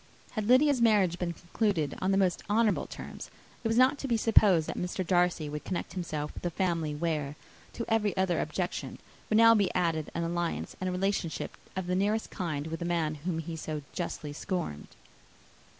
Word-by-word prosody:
Had 215 Hz, -3 st, -3 dB
Lydia's 260 Hz, +1 st, +5 dB
marriage 200 Hz, -6 st, +4 dB
been 175 Hz, -1 st, -1 dB
concluded 175 Hz, -4 st, -1 dB
on 185 Hz, -, +1 dB
the 195 Hz, -, +3 dB
most 185 Hz, -3 st, +2 dB
honourable 220 Hz, 0 st, +2 dB
terms, -, -, -8 dB, 0.3 s
it -, -, +1 dB
was 225 Hz, +1 st, +1 dB
not 260 Hz, +3 st, +5 dB
to 275 Hz, -, -3 dB
be 235 Hz, -3 st, +2 dB
supposed 205 Hz, -7 st, +5 dB
that -, -, -3 dB
Mr. 180 Hz, +1 st, -2 dB
Darcy 175 Hz, -3 st, +2 dB
would 150 Hz, 0 st, -5 dB
connect 175 Hz, -2 st, -4 dB
himself 155 Hz, -5 st, -3 dB
with -, -, -9 dB
a 175 Hz, -, 0 dB
family, 165 Hz, -4 st, -1 dB
where 150 Hz, -3 st, -2 dB, 0.4 s
to 230 Hz, -, -4 dB
every 210 Hz, -3 st, +1 dB
other 190 Hz, -2 st, +2 dB
objection -, -, -3 dB, 0.3 s
would 215 Hz, -, +3 dB
now 230 Hz, 0 st, +8 dB
be 200 Hz, -4 st, +2 dB
added 165 Hz, -4 st, 0 dB
an 170 Hz, -, 0 dB
alliance 170 Hz, 0 st, -2 dB
and 185 Hz, -, 0 dB
relationship 185 Hz, -2 st, -1 dB, 0.2 s
of 190 Hz, -1 st, -2 dB
the 180 Hz, -, -1 dB
nearest 205 Hz, +4 st, 0 dB
kind 155 Hz, -7 st, -3 dB
with 160 Hz, 0 st, -4 dB
the -, -, -3 dB
man 165 Hz, -3 st, 0 dB
whom 180 Hz, -3 st, 0 dB
he 165 Hz, +1 st, -4 dB
so 155 Hz, -2 st, -4 dB
justly 155 Hz, -4 st, -4 dB
scorned. 145 Hz, -, -4 dB
180 Hz, 190 wpm, -30 LUFS, 165-210 Hz, 0.4 s, now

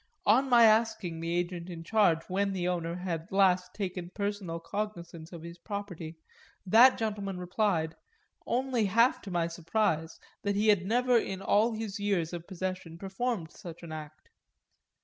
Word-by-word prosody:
On 255 Hz, +6 st, +4 dB
my 240 Hz, -2 st, +7 dB
asking 220 Hz, -6 st, +3 dB
the 165 Hz, +1 st, -2 dB
agent 175 Hz, 0 st, -3 dB
in 165 Hz, -2 st, -7 dB
charge 175 Hz, -4 st, +3 dB
when 195 Hz, +1 st, 0 dB
the 180 Hz, -2 st, -1 dB
owner 170 Hz, -2 st, -2 dB
had 175 Hz, -3 st, -4 dB
last 190 Hz, -2 st, +3 dB
taken 180 Hz, -3 st, -4 dB
personal 200 Hz, -3 st, -3 dB
cognisance 170 Hz, -3 st, -5 dB
of 170 Hz, -2 st, -9 dB
his 170 Hz, +1 st, -9 dB
property 180 Hz, -5 st, -6 dB, 0.5 s
that 235 Hz, +7 st, +7 dB
gentleman 205 Hz, -4 st, -3 dB
replied 180 Hz, -3 st, 0 dB, 0.5 s
only 250 Hz, -2 st, +1 dB
half 230 Hz, +6 st, +3 dB
to 200 Hz, -, -9 dB
my 175 Hz, -2 st, 0 dB
surprise 165 Hz, -1 st, -1 dB, 0.2 s
that 200 Hz, -1 st, -1 dB
he 215 Hz, +2 st, +2 dB
had 190 Hz, -3 st, +3 dB
never 245 Hz, +2 st, +3 dB
in 190 Hz, -3 st, -4 dB
all 215 Hz, +4 st, +2 dB
his 215 Hz, -2 st, -4 dB
years 190 Hz, -5 st, 0 dB
of 170 Hz, -1 st, -6 dB
possession 185 Hz, -3 st, -5 dB
performed 195 Hz, -1 st, -3 dB
such 170 Hz, -1 st, -10 dB
an 165 Hz, -, -8 dB
act. 155 Hz, -1 st, -9 dB
185 Hz, 160 wpm, -30 LUFS, 170-210 Hz, 0.5 s, my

